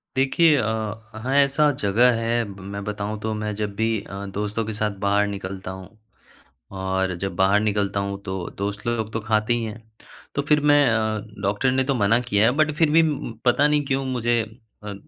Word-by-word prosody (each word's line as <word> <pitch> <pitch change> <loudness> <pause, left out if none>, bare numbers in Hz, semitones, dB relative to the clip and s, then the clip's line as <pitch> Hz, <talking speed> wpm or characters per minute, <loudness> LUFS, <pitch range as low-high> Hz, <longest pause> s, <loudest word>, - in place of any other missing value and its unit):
देखिए 145 +4 +4
अ, - - +1
वहाँ 110 +3 -4
ऐसा 140 +2 +4
जगह 115 +5 +4
है 115 +1 +1
मैं 100 0 -7
बताऊँ 105 0 -4
तो 110 0 -2
मैं 105 0 -3
जब 105 -1 -3
भी 110 +1 +1
अ, 100 +1 -7
दोस्तों 105 +3 -3
के 110 - -4
साथ 105 0 -1
बाहर 100 +1 +3
निकलता 95 -1 -6
हूँ 95 +3 -11 0.8
और 95 -1 -1
जब 95 - -3
बाहर 95 +2 +4
निकलता 100 -2 0
हूँ 100 0 -4
तो 95 -1 -4 0.2
दोस्त 100 +3 -4
लोग 110 -2 -1
तो 110 - -1
खाते 110 +1 +1
ही 120 -1 -1
हैं। 110 +1 -6 0.5
तो 140 - +1
फिर 150 -1 +5
मैं 145 - +6
अ, 110 -1 0 0.2
डॉक्टर 105 +6 +1
ने 130 0 +2
तो 135 0 0
मना 115 +2 +3
किया 105 -1 +2
है 120 - +4
बट 155 0 +3
फिर 160 -1 +3
भी 165 +1 +6
उ - - +3
म 115 - -6
पता 140 +4 +4
नहीं 150 -1 +2
क्यों 135 0 -1
मुझे 120 -2 0 0.4
अ, 105 -1 -5
110 Hz, 205 wpm, -23 LUFS, 100-125 Hz, 0.8 s, मैं